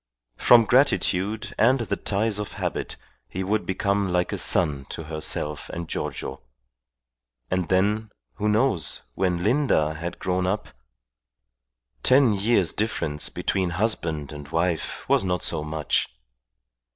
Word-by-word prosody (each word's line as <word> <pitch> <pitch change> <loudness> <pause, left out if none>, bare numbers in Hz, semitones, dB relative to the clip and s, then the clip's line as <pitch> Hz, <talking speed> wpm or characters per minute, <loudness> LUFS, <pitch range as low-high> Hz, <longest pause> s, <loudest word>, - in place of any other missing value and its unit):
From 120 -2 +6
gratitude 110 -4 +1
and 125 +4 +4
the 100 -3 -1
ties 105 +1 -1
of 105 - -5
habit - - -3 0.3
he 95 - -3
would 105 +3 -1
become 100 0 0
like 90 0 0
a - - -1
son 70 -2 +2
to 80 - -5
herself 75 -1 -3
and 85 0 -5
Giorgio; - - -4 1.1
and 90 -2 0
then, 105 +4 +1 0.3
who 105 - 0
knows, 105 - +1
when 90 +3 0
Linda 110 - +2
had 85 +3 -5
grown 90 0 -1
up.... 105 +3 -2 1.3
Ten 130 - +5
years' 100 -3 +2
difference 80 -9 -1
between 95 -2 -1
husband 80 -9 0
and 75 -1 -8
wife 80 0 -2
was - - +3
not 90 -2 -1
so 75 - -1
much. 75 -1 0
95 Hz, 130 wpm, -25 LUFS, 80-110 Hz, 1.3 s, From